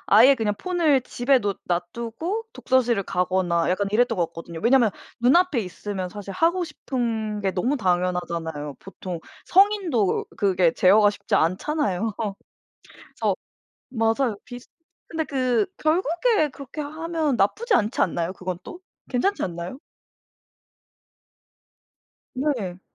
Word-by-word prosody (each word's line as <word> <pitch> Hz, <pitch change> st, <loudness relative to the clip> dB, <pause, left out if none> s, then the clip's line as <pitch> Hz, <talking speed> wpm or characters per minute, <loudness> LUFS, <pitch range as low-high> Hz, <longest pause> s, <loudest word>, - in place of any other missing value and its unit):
아예 260 Hz, +5 st, +8 dB
그냥 215 Hz, -4 st, 0 dB
폰을 335 Hz, -7 st, +2 dB
집에 255 Hz, +2 st, +2 dB
놓 200 Hz, -2 st, -2 dB
놔 175 Hz, 0 st, +1 dB
두고 320 Hz, -, -3 dB
독서실을 245 Hz, -, +2 dB
가거나 180 Hz, -2 st, 0 dB
약간 200 Hz, +2 st, 0 dB
이랬던 245 Hz, +3 st, +3 dB
거 170 Hz, -2 st, +1 dB
같거든요. 165 Hz, 0 st, -9 dB
왜냐하면 240 Hz, -3 st, +5 dB, 0.3 s
눈 245 Hz, +6 st, +4 dB
앞에 355 Hz, -7 st, +3 dB
있으면 190 Hz, 0 st, -5 dB
사실 200 Hz, +1 st, -8 dB
하고 340 Hz, -, +2 dB
싶은 225 Hz, -9 st, -3 dB
게 195 Hz, -, +1 dB
너무 240 Hz, +10 st, 0 dB
당연하잖아요. 175 Hz, -, -1 dB
보통 185 Hz, -2 st, -7 dB, 0.3 s
성인도 375 Hz, -, +3 dB
그게 185 Hz, -4 st, +3 dB
제어가 205 Hz, +3 st, +5 dB
쉽지 205 Hz, -, -6 dB
않잖아요. 210 Hz, -, 0 dB, 0.8 s
그래서 -, -, -2 dB, 0.5 s
맞아요. 225 Hz, -1 st, +1 dB
비슷 245 Hz, 0 st, -10 dB, 0.4 s
근데 320 Hz, -1 st, -2 dB
그 255 Hz, -, +1 dB
결국에 335 Hz, -, +2 dB
그렇게 280 Hz, +2 st, -8 dB
하면 315 Hz, -1 st, -2 dB
나쁘지 415 Hz, -, +1 dB
않지 215 Hz, +1 st, +1 dB
않나요, 170 Hz, 0 st, 0 dB
그것도? 185 Hz, -, -7 dB, 0.3 s
괜찮지 385 Hz, +11 st, 0 dB
않나요? 175 Hz, +7 st, -5 dB, 2.6 s
네. 245 Hz, -10 st, -2 dB
230 Hz, 280 characters per minute, -24 LUFS, 185-290 Hz, 2.6 s, 아예